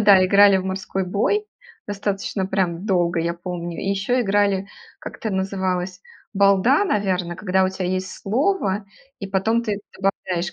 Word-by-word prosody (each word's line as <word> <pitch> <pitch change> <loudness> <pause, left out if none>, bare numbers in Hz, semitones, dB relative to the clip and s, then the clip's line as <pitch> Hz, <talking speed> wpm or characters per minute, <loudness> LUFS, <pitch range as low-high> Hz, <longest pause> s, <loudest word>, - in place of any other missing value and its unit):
да, 200 -3 +6
играли 200 +1 +6
в 185 - -2
"морской 190 0 -3
бой", 215 - 0 0.4
достаточно, 200 -1 -2
прям, 190 -1 -1
долго, 175 -3 +1
я 170 +1 -1
помню. 175 -1 -6
И - - -3
еще 200 +6 0
играли, 200 -2 +1 0.3
как - - -8
это 220 - -4
называлось, 190 -1 -2 0.3
"балда", 200 - +4
наверно, 185 - 0
когда 190 0 +1
у - - +2
тя 190 -1 -4
есть 185 +1 -2
слово, 215 - 0 0.3
и 200 - -5
потом 210 +5 +1
ты 210 -2 -3 0.2
добавляешь 185 -2 -1
195 Hz, 155 wpm, -22 LUFS, 185-205 Hz, 0.4 s, да